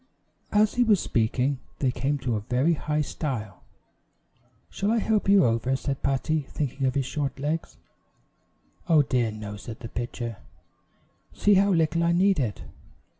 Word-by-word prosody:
As 210 0 +3
he 245 - +3
was 215 -5 +4
speaking, 125 +3 0 0.2
they 130 -3 +1
came 140 +3 -1
to 125 -4 -2
a - - 0
very 125 +10 +1
high 150 -1 -1
stile. 115 - -4 1.1
"Shall 200 - -1
I 230 - +2
help 215 -2 +1
you 200 -2 +6
over?" 115 +3 +1
said 135 0 -3
Patty, 140 +2 0
thinking 135 -2 -2
of 130 - -1
his 135 -2 0
short 140 0 -3
legs. 155 +4 -3 1.1
"Oh, 155 -3 +6
dear, 125 -3 +1
no," 105 -1 -7
said 110 +2 -9
the 115 - -7
pitcher; 120 -2 -5 1.0
"see 205 - +3
how 200 +1 +4
little 165 -1 +2
I 170 0 +3
need 190 0 +3
it." 115 -7 -2
140 Hz, 160 wpm, -26 LUFS, 120-170 Hz, 1.1 s, you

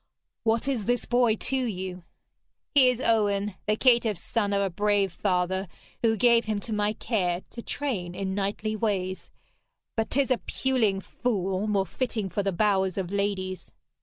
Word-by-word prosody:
'What 225 +2 +1
is 250 -7 -1
this 245 +2 0
boy 240 -2 +3
to 265 - -3
you?' 190 -8 -3 0.7
'He 265 -3 +7
is 250 -1 0
Owen, 210 -4 +1
the 215 - +3
caitiff 235 -4 +3
son 205 +3 -1
of 200 - +2
a 195 -1 0
brave 200 0 +1
father, 190 0 0 0.3
who 225 -1 +3
gave 235 +1 +4
him 215 -1 -1
to 225 - -4
my 210 0 +1
care 190 -6 -1
to 235 - -7
train 200 -12 -3
in 190 0 -2
knightly 205 +2 -2
ways. 190 -4 -2 0.7
But 225 -1 0
'tis 270 -1 +1
a 255 - +3
puling 225 -8 0
fool, 195 -3 -1
more 200 -2 +1
fitting 220 0 -2
for 205 - -1
the 195 0 0
bowers 190 0 +1
of 185 -2 -2
ladies.' 195 -2 -2
205 Hz, 165 wpm, -27 LUFS, 190-230 Hz, 0.7 s, He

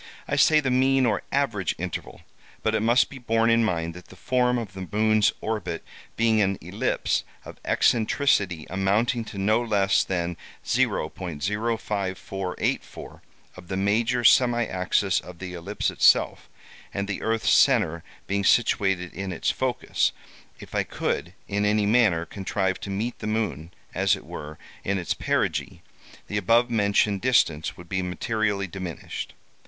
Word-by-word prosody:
I - - 0
say 155 -1 +5
the 135 -3 -1
mean 130 +1 +3
or 105 -4 +1
average 115 -10 0
interval, 90 -2 -6 0.4
but 110 - +1
it 110 - +2
must 115 +3 +3
be 135 - -10
borne 115 -1 +2
in 115 0 +4
mind 85 -5 -1
that 90 +1 -12
the - - -14
form 125 +4 +1
of 110 -5 -5
the 95 -1 -7
moon's 110 0 +3
orbit 110 -5 -3 0.3
being 115 -1 +3
an 95 -1 +1
ellipse - - -1 0.2
of - - -11
eccentricity 105 - +2
amounting 105 +5 +1
to 100 - -9
no 110 +4 +2
less 100 -4 +2
than 85 -2 -2 0.3
0.05484 95 +1 -2 0.3
of 90 -1 -13
the 95 - -3
major 115 +5 +1
semi 120 0 +5
axis 90 0 +1
of 90 -1 -11
the 90 0 -7
ellipse 85 -1 -2
itself, - - +3 0.4
and 100 0 -3
the 100 - -4
earth's 115 0 +1
centre 95 - +4 0.2
being 100 0 -1
situated 95 -5 +2
in 95 -1 -4
its 85 - 0
focus, - - 0 0.5
if - - -12
I - - +2
could, - - -3
in 100 +1 -1
any 105 0 +2
manner, 100 -7 +3
contrive 95 +2 -2
to - - -7
meet 110 +5 -3
the 105 - -5
moon, 95 -8 -2 0.2
as - - +2
it - - -12
were, 75 +1 -8 0.3
in 100 0 0
its 85 - -1
perigee, - - -1 0.4
the 105 - -3
above 115 +3 +3
mentioned 100 -2 +2
distance 85 -11 +2
would 85 - -12
be 95 +1 -1
materially 100 +2 -1
diminished. 95 -2 -6
100 Hz, 150 wpm, -25 LUFS, 95-115 Hz, 0.5 s, say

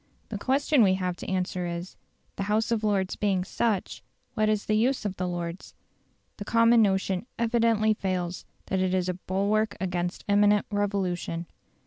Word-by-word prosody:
The - - -4
question 275 +1 +2
we 190 -3 +5
have 180 -1 -2
to - - -7
answer 180 -1 -1
is, 170 +2 -5 0.4
"The - - -4
House 220 +2 +1
of 225 -2 0
Lords 200 -3 +1
being 195 -3 0
such, 205 0 -1 0.3
what 215 0 +1
is 215 -1 0
the 215 - 0
use 240 +2 +1
of 195 -2 -2
the 180 - -2
Lords?" 175 0 -5 0.6
The 205 - -5
common 230 +2 +4
notion 190 0 +1
evidently 230 -2 +2
fails, 185 -3 -3 0.2
that 190 - -1
it 185 0 +1
is 185 -1 0
a - - 0
bulwark 200 +4 0
against 180 -1 -3
imminent 205 0 +4
revolution. 190 -4 -1
200 Hz, 165 wpm, -27 LUFS, 185-215 Hz, 0.6 s, we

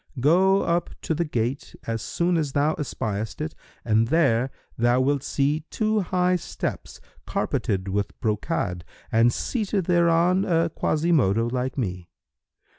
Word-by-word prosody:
Go 185 +8 +4
up 170 +1 0
to - - 0
the 170 +2 0
gate 125 -2 -3
as 115 -1 -2
soon 175 +1 0
as 150 -5 -1
thou 145 +2 +2
espiest 110 -8 -4
it 155 +1 -3 0.3
and 110 0 +3
there 135 -4 +2 0.3
thou 120 +2 +3
wilt 140 +1 +1
see 145 +2 0
two 215 0 +1
high 180 -1 +1
steps, - - -5 0.3
carpeted 95 -1 -1
with 100 +1 -2
brocade, 105 - -1 0.3
and 115 +2 +4
seated 205 - -1
thereon 175 +1 +3
a 165 -3 +2
Quasimodo 150 - +2
like 130 +1 -2
me. 90 -8 -3
145 Hz, 135 wpm, -25 LUFS, 115-170 Hz, 0.3 s, Go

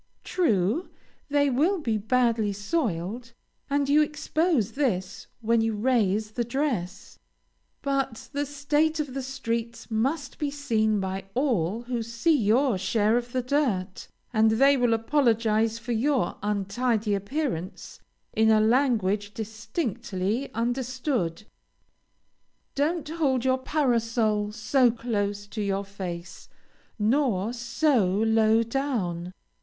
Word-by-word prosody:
True, 240 - +1 0.4
they 285 -1 +2
will 320 +10 +2
be 240 -10 -1
badly 225 -1 +1
soiled, 215 - -2 0.4
and 285 0 +1
you 295 +2 +5
expose 300 - 0
this 205 -9 -2
when 230 0 +2
you 225 -1 0
raise 215 -2 +1
the 240 +2 -1
dress, 235 - -3 0.6
but 270 -4 -2
the 285 0 -1
state 295 +3 0
of 290 -4 -3
the 270 - -3
streets 235 -3 -4
must 265 +6 -1
be 295 - 0
seen 220 -7 0
by 190 0 -3
all 230 - 0
who 240 -1 -3
see 235 +8 +1
your 235 -1 +2
share 210 +3 +2
of 240 0 -2
the 255 0 -1
dirt, 240 -9 -1 0.3
and 220 -1 +4
they 275 +6 +5
will 245 -3 +3
apologize 225 -3 +2
for 235 +1 -6
your 240 -3 +1
untidy 210 +2 0
appearance 200 - -3 0.3
in 220 0 +3
a 220 -1 +5
language 215 -4 +1
distinctly 220 - -3
understood. 245 - -1 1.3
Don't 305 +3 0
hold 280 -6 0
your 260 0 +2
parasol 230 -7 +1
so 235 +4 +3
close 205 -4 -2
to 210 +1 -5
your 200 0 -1
face, 180 -3 -7 0.5
nor 225 -2 +1
so 240 +1 +1
low 220 +3 +3
down. 210 -9 -2
230 Hz, 120 wpm, -26 LUFS, 210-270 Hz, 1.3 s, you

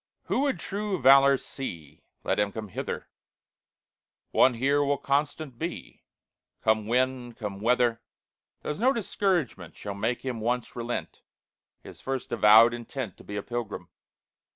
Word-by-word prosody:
"Who - - -1
would 280 -1 0
true 200 -1 -3
valor 135 +1 +7
see, 85 - -8 0.2
Let - - 0
him 105 -1 +1
come 110 0 -6
hither; - - -5 1.2
One 130 -2 +5
here 140 +4 +2
will 140 0 +1
constant 145 -2 -1
be, 170 +2 -6 0.6
Come 110 -1 +2
wind, 125 0 0
come 105 -5 -5
weather; 120 0 +2 0.6
There's 150 - -4
no 255 +4 +4
discouragement 180 - -1
Shall 100 - -6
make 115 +5 -2
him 125 -3 -3
once 120 +2 -2
relent 120 0 -4 0.6
His - - -12
first 135 -1 -4
avowed 115 +1 +7
intent 120 -3 -5
To - - -14
be 105 - -7
a 100 - -3
pilgrim. 115 -7 -5
125 Hz, 140 wpm, -27 LUFS, 110-140 Hz, 1.2 s, valor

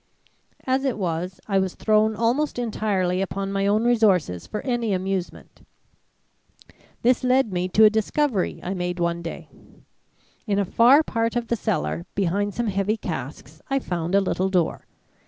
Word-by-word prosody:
"As 260 +1 +1
it 265 -5 -1
was, 180 0 -3
I 195 -2 +2
was 190 -1 -2
thrown 215 0 +2
almost 245 +7 0
entirely 200 -6 -1
upon 195 +1 -3
my 195 0 0
own 210 +2 +2
resources 200 - +2
for 210 - -4
any 240 -5 -1
amusement. 190 -1 -4 1.4
This 250 +2 +3
led 255 -4 +2
me 180 0 -1
to 215 +4 +4
a 215 - +9
discovery 220 0 0
I 185 - -3
made 180 -1 -3
one 170 0 -1
day. 165 - -7 1.0
In 200 -2 +1
a 200 - +1
far 250 - +5
part 230 -4 -1
of 240 -1 -2
the 235 - +2
cellar 80 - -2
behind 200 +1 0
some 240 - -1
heavy 200 +1 0
casks, 155 - -7
I 275 - +1
found 175 -7 -2
a 200 - +5
little 190 0 0
door. 180 -4 -1
200 Hz, 160 wpm, -23 LUFS, 180-230 Hz, 1.4 s, a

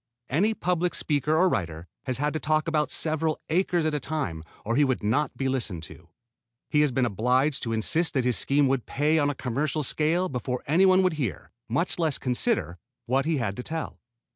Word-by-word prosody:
Any 205 +11 +2
public 180 -2 0
speaker 150 +1 0
or 185 +3 +5
writer 85 - -2 0.2
has 130 - -1
had 145 +2 0
to 155 - -1
talk 155 +1 +1
about 150 -2 +1
several 155 0 -1
acres 175 0 +1
at 155 - +1
a 150 - 0
time 135 - -3 0.2
or 115 +2 0
he 150 - +4
would 130 -5 0
not 120 +9 0
be 135 - -1
listened 115 -11 -2
to. 80 +1 -13 0.6
He 150 - +4
has 150 -2 +3
been 125 0 +1
obliged 125 +6 +1
to 115 - -3
insist 160 +10 +1
that 130 -2 +1
his 125 -2 +2
scheme 140 0 +2
would 130 -2 0
pay 150 +3 +2
on 145 -1 +2
a 145 - -2
commercial 145 +5 -1
scale 160 +7 +1
before 125 -2 -3
anyone 185 +5 +4
would 185 -2 +2
hear, 125 - -4 0.2
much 170 +10 0
less 160 -4 +1
consider, 125 - -1 0.3
what 135 +3 +1
he 160 -1 +1
had 110 -6 -2
to - - -3
tell. 160 +4 -5
145 Hz, 205 wpm, -26 LUFS, 125-160 Hz, 0.6 s, or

